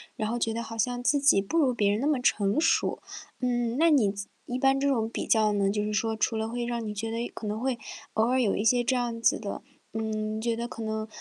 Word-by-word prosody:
然 215 0 -2
后 240 - -1
觉 225 -1 0
得 230 - -3
好 225 0 -8
像 245 +2 -1
自 285 +3 +3
己 275 -8 +5
不 200 +12 -2
如 270 -6 +3
别 205 -3 +2
人 205 - 0
那 280 - 0
么 300 -3 +2
成 205 +2 +2
熟。 330 0 +2 0.4
嗯， 240 -2 0
那 330 +2 +5
你 250 -10 +4
自 200 0 -6 0.2
一 245 - -3
般 270 +1 +3
这 280 - +1
种 225 -5 +1
比 - - -4
较 215 -2 +4
呢， 200 -1 +1
就 210 +1 0
是 210 - -2
说 220 +1 0
除 220 +1 0
了 220 0 -1
会 240 +1 -3
让 235 -2 -3
你 210 - -3
觉 225 +2 -4
得， 230 - -3
哎， 235 - -3
可 220 - -7
能 210 +1 -2
会 255 0 -1 0.4
偶 220 +1 +2
尔 260 0 +2
有 210 - +2
一 205 - -1
些 240 +2 +3
这 260 - +2
样 240 -2 -2
子 - - +3
的 205 -2 -5 0.3
嗯， 215 0 -2
觉 235 0 0
得 235 0 -3
可 230 - -7
能， 220 0 -3
230 Hz, 295 characters per minute, -27 LUFS, 215-245 Hz, 0.4 s, 己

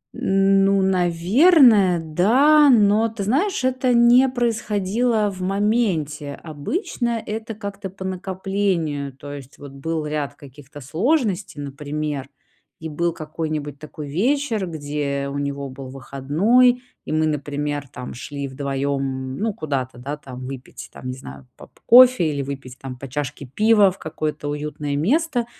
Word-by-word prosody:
М, 195 0 +3
ну, 195 0 +3
наверное, 190 - +5
да, 250 - +4
но, 220 -2 +4
ты 220 -2 -5
знаешь, 280 - 0
это 255 -1 +1
не 240 +3 +6
происходило 220 -2 0
в 185 -1 -9
моменте. 185 -8 0
Обычно 230 - -3
это 220 +1 -5
как-то 200 -2 -6
по 190 0 -9
накоплению, 185 -6 -2
то 145 +2 -9
есть 140 -1 -10
вот 140 -1 -10
был 155 +3 -3
ряд 150 -2 -3
каких-то 145 +1 -13
сложностей, 200 - 0
например, 145 0 -4 0.5
и 160 - -6
был 170 +3 0
какой-нибудь 155 -3 -5
такой 155 -1 -8
вечер, 225 - 0
где 145 -3 -3
у 140 - -4
него 140 -1 -3
был 130 0 -9
выходной, 170 - +2 0.2
и - - -5
мы, 155 0 +2
например, 145 -1 -2
там, 125 -1 -8
шли 140 +3 -6
вдвоём, 140 0 -2
м, 130 -1 -4
ну, 220 +1 -1
куда-то, 135 - -3
да, 140 +4 -5
там, 130 -3 -9
выпить, 130 0 -9
там, 130 - -9
не 130 0 -4
знаю, 65 - -11
поп - - -16
кофе 245 -8 +7
или 145 -2 -2
выпить, 135 -2 -7
там, 130 -2 -7
по 135 - -7
чашке 140 +1 -4
пива 210 - +4
в 185 - -9
какое-то 155 -1 -4
уютное 150 0 -3
место. 250 - +1
160 Hz, 145 wpm, -22 LUFS, 140-215 Hz, 0.5 s, кофе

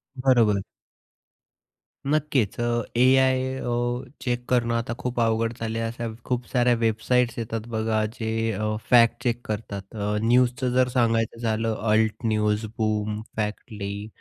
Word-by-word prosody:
बरोबर. 120 -7 +3 1.5
नक्कीच 140 -8 +1
अ, - - 0 0.3
AI 130 +1 +5 0.3
अ, 120 +1 -2
check 120 -1 -2
करणं 120 -2 +2
आता 115 0 -2
खूप 125 -1 -3
अवघड 115 0 +1
झाले 115 0 -2
आहे. 115 - -1
अशा 120 0 -5 0.2
खूप 125 -1 -1
साऱ्या 125 -1 +3
वेबसाईट्स 115 +2 +1
येतात 115 0 -4
बघा 110 -1 +1
जे 110 -1 -2 0.2
अ, 105 +1 -1
फॅक्ट 120 -1 +5
चेक 120 -1 0
करतात. 105 -2 -4
अ, 105 0 -1
न्यूजचं 125 +1 +3
जर 130 0 +4
सांगायचं 115 -2 +1
झालं 115 -1 0 0.2
अल्ट 110 0 +3
न्यूज, 105 0 +1
बूम, 105 -1 -1 0.2
फॅक्ट 105 -1 -2
ली, 100 0 -5
115 Hz, 140 wpm, -25 LUFS, 110-125 Hz, 1.5 s, AI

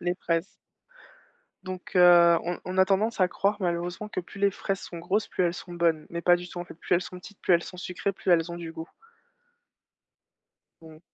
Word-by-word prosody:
Les 175 0 -1
fraises. 170 0 -1 1.1
Donc 185 0 -8
heu, 175 -1 +7
on 175 +1 -3
on 185 +1 -4
a 190 - +7
tendance 205 +2 +1
à 180 - +4
croire 205 +3 0
malheureusement 175 +3 -2
que 185 - -3
plus 195 +3 -12
les 200 0 +4
fraises 195 0 -3
sont 170 - -8
grosses, 190 +6 -1
plus 180 - 0
elles 170 - +1
sont 175 0 -9
bonnes. 165 -3 +1
Mais 170 0 -5
pas 175 0 +5
du 175 0 -8
tout, 175 - -8
en 175 - -4
fait, 175 - -12
plus 175 - -1
elles 175 - +2
sont 180 0 -9
petites, 205 +2 -14
plus - - +2
elles 170 0 +4
sont 180 - -9
sucrées, 180 +2 -3
plus 185 - -3
elles 170 0 +3
ont 170 - -5
du 165 -1 -7
goût. 160 +1 -8 1.9
Mmh. 160 -1 -14
175 Hz, 220 wpm, -27 LUFS, 170-190 Hz, 1.9 s, heu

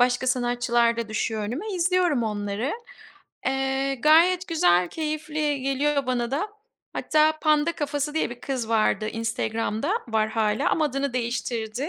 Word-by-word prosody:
başka 245 +1 +2
sanatçılar 240 -2 +1
da 230 -2 -3
düşüyor 215 0 -2
önüme, 245 - -4
izliyorum 355 -6 +2
onları. 210 +3 -2 0.7
Eee, 270 +1 0
gayet 335 +7 +4
güzel, 180 - +3
keyifli 305 - -2
geliyor 275 0 0
bana 240 -1 -1
da. 320 +10 -1 0.4
Hatta 310 0 +2
Panda 305 +1 +3
Kafası 295 -1 -2
diye 320 - 0
bir 240 - -9
kız 255 -5 -3
vardı 215 -1 +1
Instagram'da 225 - -2 0.2
var 220 -1 +1
hâlâ 215 -1 +1
ama 315 - +2
adını 275 -1 -1
değiştirdi. 240 +1 -2
260 Hz, 135 wpm, -25 LUFS, 225-300 Hz, 0.7 s, gayet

